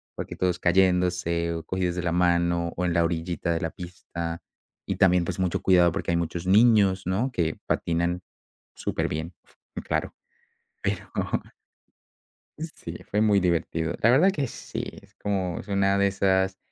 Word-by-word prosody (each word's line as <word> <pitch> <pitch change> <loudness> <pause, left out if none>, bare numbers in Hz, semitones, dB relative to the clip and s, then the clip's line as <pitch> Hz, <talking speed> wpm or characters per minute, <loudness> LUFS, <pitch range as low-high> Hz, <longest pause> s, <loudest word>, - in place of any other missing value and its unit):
Porque - - -6
todos 90 -1 0
cayéndose 90 -2 +2
o 80 -1 -5
cogidos 90 -2 -1
de 90 - -3
la 85 - 0
mano 85 -1 +2
o 90 - -1
en 85 - +1
la 85 0 +3
orillita 85 +1 -2
de 80 - -2
la 80 - -2
pista 85 -2 -6 0.4
y - - -3
también, 90 -2 +4
pues, - - -4
mucho 90 -2 0
cuidado 90 -2 +5
porque 85 - -2
hay 85 - +2
muchos 85 +1 -3
niños, 100 -2 +5
¿no? 110 +9 0
que 80 -8 -1
patinan 85 +1 0 0.5
súperbien, 80 +3 -3 0.5
claro, - - -2 0.7
pero - - -3 1.5
Sí, 155 - -7
fue 105 - +1
muy 105 -2 +4
divertido. 85 -2 0
La 115 - +6
verdad 155 +10 +5
que 145 -7 -1
sí, - - -6 0.2
es - - -22
como 95 -4 -2
es - - -12
una 100 0 +2
de 100 0 +4
esas 95 -1 +1
90 Hz, 160 wpm, -26 LUFS, 85-95 Hz, 1.5 s, La